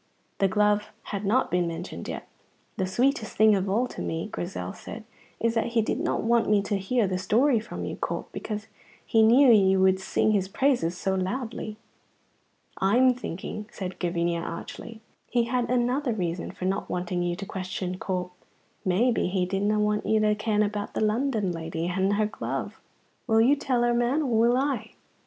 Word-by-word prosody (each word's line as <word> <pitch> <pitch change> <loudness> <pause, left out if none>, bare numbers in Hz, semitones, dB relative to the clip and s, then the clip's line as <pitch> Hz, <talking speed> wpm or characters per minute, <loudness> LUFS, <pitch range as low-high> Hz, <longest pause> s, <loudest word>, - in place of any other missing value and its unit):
The 195 - +4
glove 210 +1 +2 0.2
had 200 0 -3
not 245 +7 +2
been 180 -1 +1
mentioned 165 +2 -6
yet. - - -6 0.5
"The 190 -3 0
sweetest 240 +3 0
thing 215 0 +6
of 195 -1 0
all 225 +6 +2
to - - -7
me," 165 +5 -3
Grizel 95 - -4
said, 220 - -9 0.4
"is 230 0 +1
that 230 0 -1
he 225 - +4
did - - -1
not - - -1
want 230 -1 +2
me 205 -1 +3
to 205 0 -1
hear 225 +4 +1
the 185 -1 -1
story 235 +6 +3
from 220 - -6
you, - - -5
Corp, - - -3
because 215 0 -5 0.4
he 225 - +3
knew 245 +4 +7
you 190 -2 +4
would 190 0 +4
sing 190 +3 +1
his 195 -3 +1
praise 195 -7 +1
so 190 +1 -1
loudly." 215 +3 -3 1.0
"I'm 245 +7 +4
thinking," 210 -2 -6
said 185 -1 -6
Gavinia, 170 -1 0
archly, 220 +6 -7 0.3
"he 240 -1 +2
had 240 0 -1
another 250 +1 +1
reason 175 -4 -3
for 185 - -6
no 195 +2 0
wanting 180 0 -2
you 175 0 -1
to 195 +2 -6
question 185 -1 -4
Corp. 180 -1 -3 0.5
Maybe 220 +6 +2
he 180 0 0
didna 200 +3 0
want 210 0 0
you 220 - +3
to 210 0 +3
ken 215 0 +1
about 205 0 -3
the - - -1
London 215 -2 +1
lady 165 0 -4
and 190 +2 +1
her 210 +1 +2
glove. 215 - -4 0.5
Will 220 -2 +4
you 250 +6 +5
tell 255 -4 0
her, 240 0 +3
man, 240 +6 +1
or 250 -5 0
will 240 +2 +4
I?" 260 -5 -1
210 Hz, 185 wpm, -26 LUFS, 185-235 Hz, 1.0 s, knew